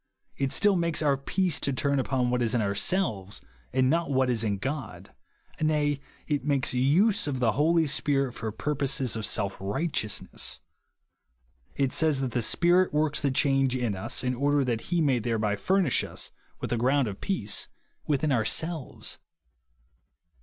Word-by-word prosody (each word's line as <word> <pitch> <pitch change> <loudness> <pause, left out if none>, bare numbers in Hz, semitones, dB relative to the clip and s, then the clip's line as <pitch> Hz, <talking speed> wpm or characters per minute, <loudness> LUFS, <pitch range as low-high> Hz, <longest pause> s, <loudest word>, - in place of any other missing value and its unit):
It 135 -1 -1
still 205 -1 +3
makes 170 -2 0
our 145 -2 +3
peace 170 +5 0
to 140 - 0
turn 140 +1 0
upon 130 -2 0
what 125 0 0
is 120 0 +1
in 120 - +2
ourselves, 100 - -1 0.3
and 130 0 +2
not 165 +4 +1
on 140 - -2
what 130 -1 +3
is 115 -2 +2
in 105 -3 0
God. 135 +4 -5 0.5
Nay, 150 -2 +1 0.3
it 145 -3 -1
makes 140 -2 0
use 165 - +3
of 135 -3 -2
the 120 -3 +3
Holy 160 +6 +2
Spirit 140 -3 0
for 110 -2 -4
purposes 135 0 0
of 110 -1 -2
self 100 -3 -1
righteousness. 105 - -2 1.2
It 135 -2 0
says 155 -4 +2
that 130 -2 -2
the 120 - 0
Spirit 175 +9 +3
works 150 0 +1
the 140 - +1
change 135 -1 +2
in 120 -5 -1
us, 95 - -2
in 125 0 0
order 140 +2 +1
that 115 -3 -1
he 175 -1 +1
may 135 -5 +2
thereby 110 -2 0
fur 190 - +1
nish 145 -9 +1
us - - -4 0.3
with - - -3
a - - 0
ground 130 +2 +2
of 100 -2 -7
peace 110 - -1 0.4
within 150 0 +1
ourselves. 140 +6 -1
135 Hz, 170 wpm, -27 LUFS, 120-150 Hz, 1.2 s, still